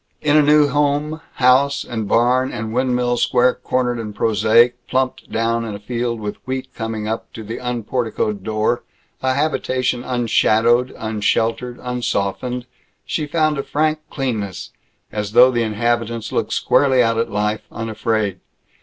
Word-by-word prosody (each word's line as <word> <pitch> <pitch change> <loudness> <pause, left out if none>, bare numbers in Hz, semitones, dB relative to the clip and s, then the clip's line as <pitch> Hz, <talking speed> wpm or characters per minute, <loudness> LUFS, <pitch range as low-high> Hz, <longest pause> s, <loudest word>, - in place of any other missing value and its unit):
In 150 0 +2
a 155 - +7
new 150 0 +5
home, 145 +2 0
house 135 +2 +3
and 110 -3 -4
barn 125 +4 +2
and 110 -1 -5
windmill 125 -1 +1
square 125 +1 +3
cornered 125 -2 -1
and 105 -2 -6
prosaic, 115 +3 +4
plumped 130 0 -1
down 115 +1 0
in 110 -3 -5
a - - -8
field 120 +2 -3
with 105 -1 -5
wheat 130 0 -4
coming 110 -2 -4
up 110 +1 -4
to 110 - -7
the 110 +2 -6
unporticoed 120 -4 -2
door, 110 +3 0 0.4
a 130 0 +1
habitation 130 -4 0
unshadowed, 120 0 +2
unsheltered, 115 +3 -1
unsoftened, 125 0 -2 0.4
she 155 -2 -2
found 155 -1 +1
a - - -2
frank 155 +1 0
cleanness, 110 - -3 0.4
as 105 -1 -4
though 125 +2 +7
the 120 -1 0
inhabitants 115 +1 -1
looked - - -1
squarely 130 -3 +3
out 115 0 +1
at 115 - 0
life, 105 +1 -1
unafraid. 110 -3 -2
120 Hz, 145 wpm, -20 LUFS, 110-130 Hz, 0.4 s, a